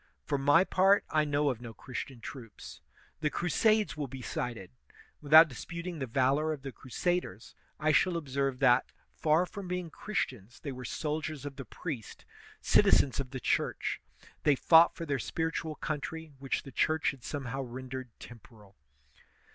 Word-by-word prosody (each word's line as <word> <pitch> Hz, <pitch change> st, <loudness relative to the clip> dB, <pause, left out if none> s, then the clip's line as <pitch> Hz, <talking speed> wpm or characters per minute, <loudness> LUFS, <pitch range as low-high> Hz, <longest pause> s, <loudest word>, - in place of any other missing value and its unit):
For 140 Hz, -2 st, 0 dB
my 145 Hz, +6 st, +5 dB
part, 195 Hz, +1 st, +4 dB
I 155 Hz, -1 st, +3 dB
know 145 Hz, -1 st, +1 dB
of 120 Hz, -2 st, -7 dB
no 115 Hz, -2 st, -9 dB
Christian 130 Hz, -1 st, -7 dB
troops. 115 Hz, -4 st, -10 dB, 0.4 s
The 155 Hz, -1 st, +1 dB
crusades 215 Hz, +7 st, +2 dB
will 150 Hz, -3 st, -3 dB
be 130 Hz, 0 st, -8 dB
cited. 115 Hz, -, -4 dB, 0.5 s
With 145 Hz, -1 st, -10 dB
out 160 Hz, +1 st, +10 dB
disputing 170 Hz, +5 st, -6 dB
the 130 Hz, -, -3 dB
valor 135 Hz, +6 st, +2 dB
of 140 Hz, -3 st, -9 dB
the 135 Hz, -, -5 dB
crusaders, 130 Hz, -, -3 dB, 0.3 s
I 155 Hz, 0 st, +2 dB
shall 170 Hz, +4 st, +3 dB
observe 135 Hz, -3 st, -1 dB
that, 125 Hz, -1 st, +4 dB, 0.2 s
far 160 Hz, +3 st, +2 dB
from 195 Hz, +1 st, -8 dB
being 180 Hz, -2 st, -3 dB
Christians, 125 Hz, -, -4 dB
they 140 Hz, -, -5 dB
were 125 Hz, -1 st, -7 dB
soldiers 155 Hz, +1 st, -3 dB
of 140 Hz, -1 st, -6 dB
the 135 Hz, -2 st, -7 dB
priest, 125 Hz, -, -7 dB, 0.4 s
citizens 135 Hz, -2 st, +4 dB
of 135 Hz, -2 st, -3 dB
the 130 Hz, 0 st, -5 dB
Church; -, -, -1 dB, 0.4 s
they 145 Hz, -2 st, +4 dB
fought 165 Hz, +5 st, +6 dB
for 165 Hz, -, -5 dB
their 140 Hz, -3 st, -1 dB
spiritual 160 Hz, +2 st, -2 dB
country, 155 Hz, +1 st, -5 dB
which 135 Hz, -1 st, -2 dB
the 135 Hz, -, -10 dB
Church 155 Hz, +5 st, +1 dB
had 135 Hz, -3 st, -15 dB
somehow 135 Hz, -2 st, -4 dB
ren 130 Hz, +1 st, -7 dB
dered 130 Hz, -1 st, -5 dB
temporal. 110 Hz, -4 st, -14 dB
140 Hz, 165 wpm, -31 LUFS, 130-160 Hz, 0.5 s, out